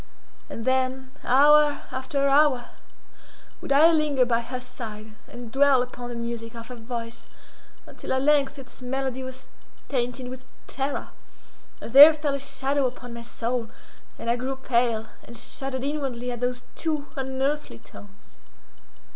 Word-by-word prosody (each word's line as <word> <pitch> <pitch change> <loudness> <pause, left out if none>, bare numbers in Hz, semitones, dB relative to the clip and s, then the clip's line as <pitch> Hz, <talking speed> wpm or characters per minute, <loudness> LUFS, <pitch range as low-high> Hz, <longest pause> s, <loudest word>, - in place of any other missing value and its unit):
And 225 - -6
then, 260 0 0
hour 295 +3 +5
after 275 +2 -1
hour, 275 -3 +3 0.9
would - - -6
I 305 +4 +7
linger 300 -5 +2
by 235 -1 +1
her 250 +2 -5
side, 220 -4 -8
and 240 -2 -10
dwell 270 -1 +4
upon 245 -1 -8
the 240 - -6
music 235 -1 -5
of 230 +1 -9
her 250 - -7
voice, 230 0 -6 0.6
until - - -8
at 260 0 0
length 290 -1 +3
its 265 -1 -12
melody 265 0 -3
was 260 0 -8 0.4
tainted 250 -1 -1
with 255 +1 -8 0.2
terror, 275 +1 -3 0.7
and 230 - -9
there 295 +3 +11
fell 295 -2 -1
a 280 - -2
shadow 275 0 0
upon 245 -1 -8
my 235 - -7
soul, 235 0 -3 0.5
and - - -8
I 235 +1 +2
grew 260 +2 -3
pale, 235 -4 0 0.2
and 235 - -10
shuddered 265 +1 -4
inwardly 270 -4 -3
at 240 - -5
those 250 0 -2
too 305 -3 -2
unearthly 265 - -2
tones. 195 - -16
260 Hz, 150 wpm, -25 LUFS, 240-275 Hz, 0.9 s, there